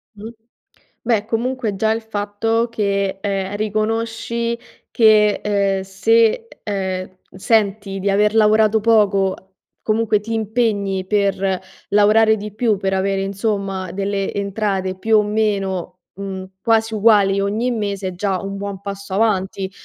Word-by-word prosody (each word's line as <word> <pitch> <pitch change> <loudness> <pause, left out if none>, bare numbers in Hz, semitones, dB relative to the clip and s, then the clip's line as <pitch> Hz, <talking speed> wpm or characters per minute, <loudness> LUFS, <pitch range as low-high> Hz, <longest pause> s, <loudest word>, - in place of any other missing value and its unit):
Mh. 215 +2 -8 0.7
Beh 225 -3 +1
comunque 230 -2 -2
già 220 +2 +1
il 225 0 -3
fatto 220 +2 -1
che, 200 -3 -1
ehm, 195 -1 -2
riconosci 225 +2 -2 0.3
che, 215 -2 +4
ehm, 200 -2 0
se, 225 - +2 0.2
ehm, 190 -3 -3 0.2
senti 200 -1 0
di 200 +1 0
aver 210 +2 +2
lavorato 215 0 +4
poco 200 -4 +3 0.5
comunque 215 -1 +1
ti 225 +2 -5
impegni 205 -4 -1
per 195 -2 0 0.3
lavorare 215 +2 +4
di 210 0 -7
più 220 -1 +1
per 195 0 -2
avere 195 0 0
insomma 195 -2 -2
delle 195 0 -2
entrate 195 -2 -2
più 220 +1 +3
o - - +4
meno, 200 -4 -1 0.2
mhmm, 190 -1 -6 0.2
quasi 225 -1 +2
uguali 205 -2 +4
ogni 215 +5 0
mese 200 -4 -2
è - - -3
già 190 0 -2
un 195 0 -5
buon 200 -1 -5
passo 200 -1 -6
avanti. 195 -2 0
205 Hz, 135 wpm, -19 LUFS, 195-220 Hz, 0.7 s, che